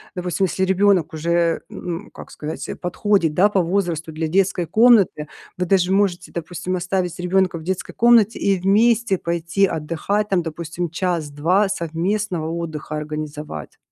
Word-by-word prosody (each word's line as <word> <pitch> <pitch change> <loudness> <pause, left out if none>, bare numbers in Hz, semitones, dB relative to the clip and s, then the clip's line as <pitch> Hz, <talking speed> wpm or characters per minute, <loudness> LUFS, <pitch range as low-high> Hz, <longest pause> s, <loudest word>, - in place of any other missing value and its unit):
допустим, 180 +1 -1
если 190 - -2
ребёнок 190 -3 +2
уже, 170 +1 +1
ну, 175 +4 -6
как - - -11
сказать, 155 +1 -6
подходит, 180 -2 +1
да, 185 +6 +5
по 195 -3 +2
возрасту 170 -3 -1
для 160 +1 -3
детской 180 +1 +1
комнаты. 205 -5 +4 0.3
Вы 180 - -1
даже 185 0 +2
можете, 195 -3 0
допустим, 175 +2 -4
оставить 180 -1 -2
ребенка 180 0 +1
в 160 - -9
детской 185 +2 -4
комнате 230 -2 +4
и 195 -2 +1
вместе 215 +2 +3
пойти 170 +3 0
отдыхать, 170 +5 -2
там 190 -2 +2
допустим 165 +1 -4
час-два 170 +2 0
совместного 170 0 -2
отдыха 160 -2 -5
организовать. 150 - -6
175 Hz, 140 wpm, -21 LUFS, 165-195 Hz, 0.3 s, да